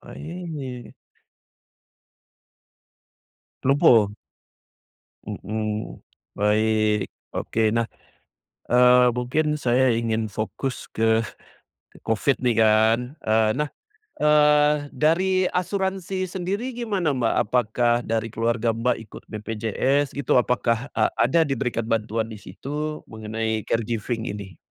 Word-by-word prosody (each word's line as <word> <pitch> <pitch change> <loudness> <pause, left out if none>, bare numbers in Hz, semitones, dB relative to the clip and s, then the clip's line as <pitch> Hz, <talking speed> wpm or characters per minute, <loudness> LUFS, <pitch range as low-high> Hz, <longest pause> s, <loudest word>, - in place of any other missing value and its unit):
aih. 150 -8 -7 2.7
Lumpuh. 115 -7 +5 1.1
Mhm, 110 +1 -4 0.3
baik, 105 0 +2 0.2
oke. 115 - -2
Nah, 115 0 0 0.8
eee, 125 0 +6
mungkin 150 +6 -1
saya 130 0 +3
ingin 115 -1 -1
fokus 110 +5 -4
ke 110 0 +2 0.7
covid 115 +5 0
nih 120 -3 +1
kan, 110 +2 +4 0.2
eee, 110 0 +2
nah, 150 +3 -1 0.5
eee, 150 0 +5 0.2
dari 185 +4 +2
asuransi 190 0 -2
sendiri 200 +8 -3
gimana, 195 - -1
Mbak? 120 -3 +1
Apakah 120 0 +2
dari 115 0 -1
keluarga 115 +1 -1
Mbak 120 +1 +1
ikut 110 - -11
BPJS 115 +6 -1
gitu? 140 -2 0
Apakah 125 +1 +1
a 110 - +2
ada 130 +8 +3
diberikan 125 -4 -2
bantuan 110 0 -1
disitu 145 +9 -6
mengenai 110 0 -3
caregiving 115 0 -2
ini? 100 -3 -7
120 Hz, 95 wpm, -24 LUFS, 110-150 Hz, 2.7 s, eee